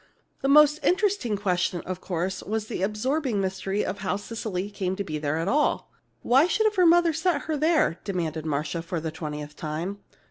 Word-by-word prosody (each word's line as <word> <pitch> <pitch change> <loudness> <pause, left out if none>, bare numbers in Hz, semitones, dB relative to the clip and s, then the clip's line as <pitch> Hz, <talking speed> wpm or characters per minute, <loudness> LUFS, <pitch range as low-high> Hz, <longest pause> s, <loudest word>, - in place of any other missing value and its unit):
The - - 0
most 300 +1 +6
interesting 370 - +1
question, 180 -2 0
of 185 0 -6
course, 180 +1 -2
was 215 +1 -3
the 200 - -5
absorbing 230 +4 0
mystery 195 +1 -1
of 195 +2 -4
how 190 -1 -1
Cecily 205 -2 -4
came 190 -2 -2
to 200 - -3
be 155 -5 -4
there 150 +1 -1
at 165 +2 -2
all. 290 +7 +1 0.3
"Why 270 +7 +5
should 435 +3 +2
her 365 -2 +4
mother 345 0 +5
have 320 - -2
sent 335 -3 +1
her 315 - -2
there?" 305 - +2
demanded 165 -5 -3
Marcia, 155 +2 -2
for 170 0 -4
the 160 0 -4
twentieth 150 -2 -6
time. 165 +6 -4
200 Hz, 190 wpm, -26 LUFS, 175-290 Hz, 0.3 s, most